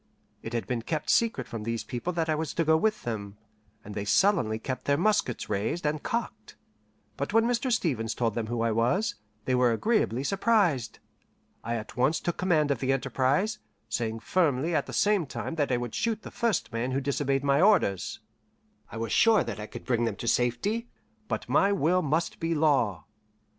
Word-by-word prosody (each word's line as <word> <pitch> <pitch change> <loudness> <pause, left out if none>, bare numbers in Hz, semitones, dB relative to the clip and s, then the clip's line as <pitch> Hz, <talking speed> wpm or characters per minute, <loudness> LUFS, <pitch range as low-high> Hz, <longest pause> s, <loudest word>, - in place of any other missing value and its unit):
It 115 - -7
had 115 - -1
been 125 -2 -2
kept 155 +6 -2
secret 230 -1 +1
from 115 - -6
these 115 +1 -3
people 125 +9 -4
that 165 -1 -1
I 155 - +2
was 155 -1 -3
to 165 - +2
go 160 +1 +5
with 215 +6 +1
them, 105 -4 -5 0.5
and 105 - -8
they 100 - -3
sullenly 125 - +2
kept 130 +3 -5
their 140 0 +2
muskets 180 - +1
raised 110 - -2
and 150 0 0
cocked; 230 - -4 0.6
but 140 +8 -3
when 225 +1 +4
Mr. 245 +2 0
Stevens 125 - 0
told 115 -3 0
them 115 -1 -3
who 120 0 -2
I 115 - +1
was, 120 - +1 0.3
they 130 - 0
were 125 -1 +4
agreeably 135 - +1
surprised. 195 - +1 0.7
I 115 - -2
at 110 0 -7
once 135 +6 +2
took 175 - -3
command 160 -5 +2
of 135 - 0
the 130 +1 0
enterprise, 135 - 0 0.3
saying 110 0 -2
firmly 160 0 +1
at - - 0
the - - -7
same 205 -6 +2
time - - -5
that 145 -3 0
I 125 - +2
would 120 -1 -5
shoot 225 -2 -1
the - - -8
first 190 - -1
man 120 +3 -1
who 135 - +1
disobeyed 140 0 0
my 140 +1 +3
orders. 115 - +2 0.7
I - - -7
was 115 -1 -3
sure 225 -1 +5
that - - -5
I 105 - -6
could - - -10
bring 120 -2 +1
them 115 -3 -2
to 115 - -6
safety, 125 - 0 0.4
but - - -3
my 200 - +3
will 180 -1 +2
must 160 +2 -1
be 165 0 -1
law. 140 - +2
140 Hz, 200 wpm, -28 LUFS, 115-180 Hz, 0.7 s, go